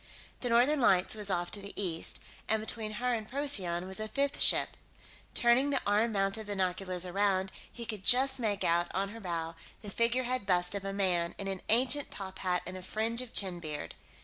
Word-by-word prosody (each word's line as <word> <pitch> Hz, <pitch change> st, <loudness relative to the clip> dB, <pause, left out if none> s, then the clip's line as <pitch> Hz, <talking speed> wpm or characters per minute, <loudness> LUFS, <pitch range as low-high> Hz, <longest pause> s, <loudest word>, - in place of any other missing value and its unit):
The 245 Hz, -, -3 dB
Northern 255 Hz, +5 st, +3 dB
Lights 185 Hz, -5 st, +4 dB
was 210 Hz, -2 st, -1 dB
off 175 Hz, -2 st, -1 dB
to 205 Hz, -, 0 dB
the 200 Hz, +1 st, -6 dB
east, 170 Hz, -5 st, +1 dB, 0.3 s
and 220 Hz, -, +3 dB
between 215 Hz, 0 st, -4 dB
her 245 Hz, +3 st, -1 dB
and 220 Hz, -2 st, -4 dB
Procyon 200 Hz, -11 st, 0 dB
was 190 Hz, +2 st, -3 dB
a 215 Hz, -, -3 dB
fifth 280 Hz, +5 st, -1 dB
ship; -, -, +4 dB, 0.7 s
turning 240 Hz, +4 st, +3 dB
the 275 Hz, -2 st, +3 dB
arm 210 Hz, +3 st, +2 dB
mounted 195 Hz, +2 st, -1 dB
binoculars 185 Hz, -2 st, 0 dB
around, 190 Hz, 0 st, 0 dB, 0.2 s
he 235 Hz, -, -7 dB
could 215 Hz, -3 st, -5 dB
just 265 Hz, +4 st, +4 dB
make 210 Hz, -4 st, -1 dB
out, 170 Hz, +1 st, +2 dB
on 195 Hz, +1 st, -1 dB
her 225 Hz, +2 st, -10 dB
bow, 165 Hz, -3 st, -3 dB, 0.3 s
the 205 Hz, -, -7 dB
figurehead 240 Hz, 0 st, 0 dB
bust 180 Hz, -1 st, +2 dB
of 200 Hz, -1 st, -4 dB
a 195 Hz, -, -2 dB
man 180 Hz, -4 st, 0 dB
in 195 Hz, -, -4 dB
an 195 Hz, -1 st, -4 dB
ancient 255 Hz, +5 st, +4 dB
tophat 190 Hz, -2 st, -3 dB
and 185 Hz, +1 st, -6 dB
a -, -, -8 dB
fringe 220 Hz, +5 st, -1 dB
of 255 Hz, -, -8 dB
chin 185 Hz, -3 st, +1 dB
beard. 150 Hz, -, -6 dB
200 Hz, 200 wpm, -31 LUFS, 185-235 Hz, 0.7 s, Lights